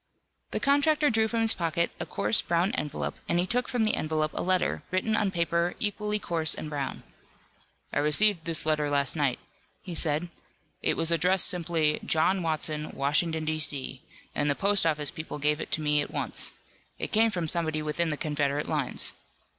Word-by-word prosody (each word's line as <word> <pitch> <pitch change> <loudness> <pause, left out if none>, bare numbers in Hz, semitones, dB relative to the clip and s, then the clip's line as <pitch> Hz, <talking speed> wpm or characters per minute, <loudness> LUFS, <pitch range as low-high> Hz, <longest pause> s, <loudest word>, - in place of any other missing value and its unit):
The - - -2
contractor 290 +1 +3
drew 220 -1 +2
from 230 +1 -1
his 225 0 +5
pocket 170 0 -1
a 175 - -4
coarse 105 -4 +1
brown 170 +4 +1
envelope, 150 - -4
and 170 - +2
he 175 - +2
took 245 +5 0
from 245 -3 0
the 215 - +2
envelope 155 0 -1
a - - -3
letter, 185 0 0
written 185 +4 0
on 210 -2 +1
paper 170 -1 0
equally 210 0 -1
coarse 165 -6 +1
and 155 - -6
brown. 140 -2 -4 0.9
"I - - +1
received 160 +5 +3
this 165 -2 +1
letter 150 -1 +1
last 140 0 +1
night," 140 -5 +1 0.5
he 180 - -7
said. 160 +1 0 0.5
"It - - 0
was 165 0 +1
addressed 180 +2 +3
simply 165 -3 +1
'John 180 +4 +2
Watson, 155 -2 -1
Washington, 155 +3 +1
D. 155 0 -1
C.,' 140 -3 0 0.3
and 145 - 0
the 145 - +2
post 200 -2 +3
office 150 -2 0
people 155 -2 -6
gave 150 +2 0
it - - -7
to 155 - 0
me 150 -1 +2
at - - -4
once. - - -2 0.5
It - - -4
came 225 0 +4
from 175 -6 -3
somebody 160 -2 0
within 155 +2 -1
the 150 - -1
Confederate 145 -1 -1
lines. 150 -5 -1
165 Hz, 185 wpm, -28 LUFS, 150-185 Hz, 0.9 s, his